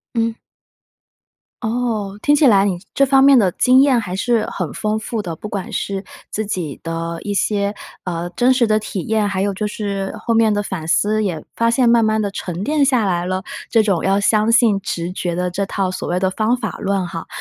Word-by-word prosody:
嗯。 230 0 0 1.3
哦， 220 -4 -2
听 290 0 +3
起 290 - +4
来 200 -4 +5
你 180 -3 -1 0.2
这 275 - +4
方 270 0 +5
面 275 -2 +7
的 195 -5 +3
经 255 +1 +4
验 270 -3 +4
还 185 -5 -4
是 225 +2 +1
很 - - -4
丰 215 0 -1
富 220 0 -4
的， 170 -4 -5
不 210 - -8
管 205 +3 -5
是 195 -2 -3 0.3
自 215 - -2
己 175 -8 -4
的 165 0 -4
一 205 - -3
些， 200 0 0 0.3
呃， 175 -1 -3
真 245 +8 +3
实 250 -2 +3
的 215 0 +2
体 205 -4 -5
验， 220 -1 +1
还 195 -2 -2
有 200 0 0
就 210 +2 -2
是 200 -2 -3
后 230 +1 -1
面 225 -1 +4
的 205 0 0
反 180 -5 -5
思 210 +5 +2
也 165 -6 -3
发 230 0 +2
现 240 0 +3
慢 235 -1 +4
慢 220 0 +1
地 200 -1 -1
沉 180 -1 -5
淀 295 -1 +2
下 250 -6 +2
来 175 -2 0
了。 185 +1 -2 0.3
这 225 -2 +4
种 195 -6 0
要 195 +1 +2
相 215 +2 +2
信 230 -4 +4
直 175 -2 -3
觉 175 -2 -3
的 180 +1 -1
这 195 +3 -2
套 195 -1 -2
所 - - -5
谓 180 +1 0
的 190 0 +1
方 220 +5 +1
法 250 - -5
论 195 -2 -1
哈。 165 -1 -6
205 Hz, 240 characters per minute, -19 LUFS, 185-230 Hz, 1.3 s, 面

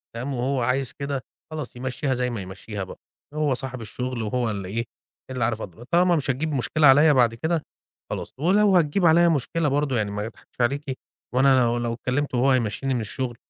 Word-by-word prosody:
تمام، 130 +4 -3
وهو 130 +1 0
عايز 130 +1 0
كده 140 -2 -3 0.3
خلاص 155 -6 -6
يمشّيها 130 +2 -2
زي 125 0 0
ما 115 -4 -4
يمشّيها 95 +2 -6
بقى 95 - -10 0.3
هو 150 -3 +1
صاحب 130 -1 -5
الشغل 125 +2 -4
وهو 115 +2 -1
اللي 100 -3 -4
إيه! 115 +4 -2 0.4
اللي 125 -3 -2
عارف 115 -1 0
أضر 100 +5 -8
طالما 175 +5 +3
مش 145 -3 -1
هتجيب 150 +4 -2
مشكلة 145 +3 +3
عليَّ 145 +3 +7
بعد 120 -4 +4
كده 160 +6 -1 0.5
خلاص - - -5
ولو 195 +3 +4
هتجيّب 170 +3 +2
عليَّ 170 +1 +6
مشكلة 165 +1 0
برضه 140 -2 +1
يعني 105 -2 0
ما 105 +1 -3
أضحكش 115 +2 -9
عليكِ 135 +2 0 0.4
وأنا 130 0 +5
لو 120 0 +2
لو 120 -1 -1
كلمته 130 +1 -1
وهو 135 +3 +4
هيمشّيني 130 +2 0
من 120 - 0
الشُغل 120 +3 -4
130 Hz, 195 wpm, -24 LUFS, 120-145 Hz, 0.5 s, عليَّ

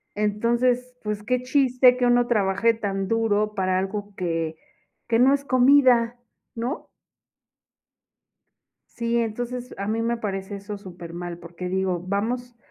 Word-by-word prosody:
Entonces, 240 +4 +1
pues, 210 -1 -3
qué 250 +3 0
chiste 255 -1 +4
que 250 - +1
uno 245 0 +4
trabaje 210 0 +2
tan 195 -3 -3
duro 215 -1 +1
para 185 -2 +1
algo 205 +1 -4
que 165 -3 -2 0.5
que 230 -1 +2
no 260 +2 +6
es 280 0 -1
comida, 255 -3 +4 0.4
¿no? 240 +6 -4 2.0
Sí, 235 0 -2
entonces, 245 +2 -3
a 200 - -3
mí 225 +2 -1
me 235 +1 0
parece 200 -2 -4
eso 200 +1 -7
supermal, 175 -2 -8
porque 175 +1 -7
digo, 185 -1 0
vamos 240 +5 -2
220 Hz, 130 wpm, -24 LUFS, 195-245 Hz, 2.0 s, no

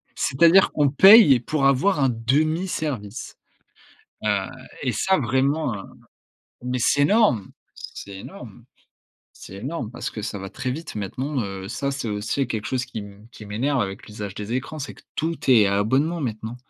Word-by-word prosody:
C'est-à-dire 170 +8 +4
qu'on 145 -2 +2
paye 180 - +8
pour 140 +2 -1
avoir 145 +6 +3
un 135 -2 +3
demi-service. 135 - -2 0.9
Heu - - +1 0.5
et 125 -3 0
ça 190 - +1
vraiment, 135 0 0
heu 95 - -7 0.8
mais 125 0 -2
c'est 140 +5 +3
énorme, 150 - +3 0.2
c'est 100 -1 -9
énorme, - - -11 0.7
c'est 95 - -12
énorme. 125 0 -5
Parce 125 - -5
que 110 - -7
ça 100 - -4
va 95 0 -7
très 125 - -4
vite 155 +5 -6
maintenant, 130 +8 -3
heu, 95 -1 -6
ça 140 +4 -2
c'est 135 -4 -4
aussi 110 +6 -1
quelque 110 -3 -4
chose 125 -1 -1
qui 110 - -6
mmh, 100 +2 -14
qui 105 - -11
m'énerve 130 +7 -1
avec 95 -2 -4
l'usage 105 -2 -7
des 105 +2 -6
écrans, 135 +4 -4
c'est 135 - -5
que - - -19
tout 165 +1 -1
est 110 -5 +6
à 100 0 +1
abonnement 140 +11 +1
maintenant 115 -2 -4
125 Hz, 170 wpm, -23 LUFS, 105-145 Hz, 0.9 s, paye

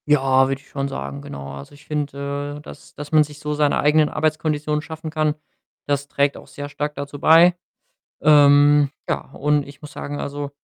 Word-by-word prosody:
Ja, 135 -2 +4
würde 135 0 -2
ich - - -24
schon 140 -1 -3
sagen: 70 - -6
„Genau.“ 70 0 -8
Also, 70 - -10
ich 145 - -19
finde, 145 -1 -4
äh, - - -10
das 150 - -13
das 145 0 -8
man 155 -1 +6
sich 150 0 -11
so 150 0 -3
seine 145 -1 +1
eigenen 150 +1 +3
Arbeitskonditionen 155 -1 -1
schaffen 160 +1 -7
kann. 155 -1 0 0.5
Das 140 0 -1
trägt 140 -1 0
auch - - -13
sehr 145 0 -8
stark 150 +1 -4
dazu 140 0 -7
bei, 165 +4 +6 0.7
ähm, 145 -1 +6 0.2
ja, - - 0
und 150 -1 0
ich 140 +1 -14
muss 150 - -10
sagen 145 0 -6
also, 145 0 -5
145 Hz, 190 wpm, -21 LUFS, 140-150 Hz, 0.7 s, man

